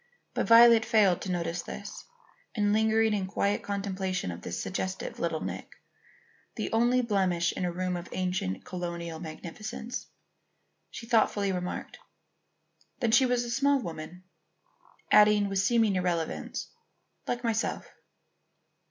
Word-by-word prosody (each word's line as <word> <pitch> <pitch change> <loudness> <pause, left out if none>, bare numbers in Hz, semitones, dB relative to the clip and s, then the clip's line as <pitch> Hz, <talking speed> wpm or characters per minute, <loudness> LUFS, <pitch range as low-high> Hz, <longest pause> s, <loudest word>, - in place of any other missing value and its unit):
But - - -1
Violet 230 0 +8
failed 215 -6 +3
to 190 - -3
notice 170 -1 -2
this, - - -8 0.5
and 205 -2 +2
lingering 220 0 +3
in 195 -2 -1
quiet 200 +1 0
contemplation 190 - -3
of 85 - -8
this 85 - -5
suggestive 185 0 -4
little 165 -2 -1
nick, - - -6 0.8
the - - -3
only 240 +2 +3
blemish 185 -6 +1
in 180 - -3
a 175 - -1
room 180 +1 -2
of 175 0 -6
ancient 180 - -2
colonial 170 -2 -5
magnificence, 185 +8 -7 0.8
she - - -9
thoughtfully 215 -4 +2
remarked: 180 -1 -5 1.0
"Then 235 -4 +1
she 255 +3 +5
was 245 -1 +1
a 240 - -5
small 280 +3 +3
woman?" 170 -3 -7 0.9
adding 210 -1 +6
with 195 0 0
seeming 220 0 +3
irrelevance 175 -3 -2 0.6
"like 245 0 -2
myself." 230 -1 -1
195 Hz, 130 wpm, -29 LUFS, 180-225 Hz, 1.0 s, Violet